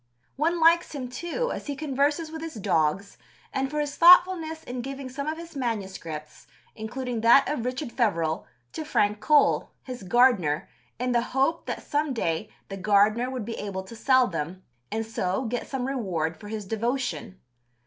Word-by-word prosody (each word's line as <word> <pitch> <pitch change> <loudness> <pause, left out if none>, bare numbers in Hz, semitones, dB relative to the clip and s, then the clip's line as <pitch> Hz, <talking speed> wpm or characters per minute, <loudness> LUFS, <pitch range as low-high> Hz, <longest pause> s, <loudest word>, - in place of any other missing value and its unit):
One 330 +4 +1
likes 335 +1 +4
him, 255 -3 -4
too, 345 - -3
as - - -6
he 285 - -3
converses 295 +2 0
with 320 0 -6
his 325 -3 -6
dogs, 190 0 0 0.3
and 270 0 -1
for 300 +1 -2
his 290 -1 -2
thoughtfulness 340 -2 +6
in 245 0 -5
giving 270 +1 -6
some 280 +3 -5
of 315 +1 -2
his 335 -1 -10
MSS., 190 - -5 0.3
including 240 +2 -4
that 235 +4 +6
of 295 -6 -2
Richard 255 +1 -3
Feverel, 165 -11 0 0.3
to 315 - -4
Frank 210 -8 +1
Cole, 300 +3 +3
his 250 -3 -7
gardener, 190 - +3 0.3
in 250 +1 -1
the 240 -1 +3 0.2
hope 320 +5 +1
that - - -4
"some 295 -1 -1
day 170 -1 -1 0.2
the 195 - -6
gardener 210 +5 +3
would 255 -5 -4
be 230 - -5
able 195 -2 -4
to 210 +5 -11
sell 260 +2 +4
them" 175 -1 -5 0.3
and 225 +1 -2
so 190 0 -2
get 240 +1 -3
some 265 -2 -3
reward 185 - -2
for 210 - -12
his 215 -1 -5
devotion. 230 -2 -2
245 Hz, 175 wpm, -26 LUFS, 205-290 Hz, 0.3 s, thoughtfulness